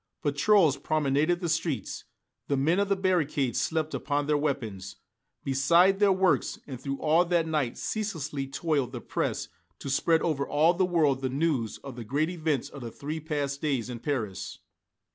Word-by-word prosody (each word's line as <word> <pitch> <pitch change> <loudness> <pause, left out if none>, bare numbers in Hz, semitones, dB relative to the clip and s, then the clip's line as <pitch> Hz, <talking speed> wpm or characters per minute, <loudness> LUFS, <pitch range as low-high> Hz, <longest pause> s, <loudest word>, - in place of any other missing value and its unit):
Patrols 150 +1 +4
promenaded 155 +4 +1
the 175 - -1
streets, 160 - -2 0.4
the 140 - +1
men 160 +7 +2
of 200 0 +1
the 200 - +3
barricades 155 - +1
slept 160 -1 -1
upon 145 -1 -1
their 150 +1 +2
weapons, 115 -11 -3 0.5
beside 170 +9 +4
their 205 -1 +5
works, 190 -1 +2
and 130 -3 -8
through 140 0 -3
all 160 +4 +3
that 170 -2 +1
night 150 -7 -1
ceaselessly 155 -10 -3
toiled 140 -3 -1
the 120 - -4
press - - -2 0.3
to 140 - -5
spread 160 +4 +2
over 145 -4 0
all 155 +4 +4
the 185 +1 +2
world 150 -7 +2
the 130 - -1
news 135 -5 0
of 135 -3 -8
the 120 - -6
great 145 +9 0
events 155 -6 -1
of 140 -1 -10
the 120 - -5
three 150 +7 -5
past 145 -3 -3
days 130 -6 -1
in 120 - -6
Paris. 115 - -3
145 Hz, 175 wpm, -28 LUFS, 135-165 Hz, 0.5 s, their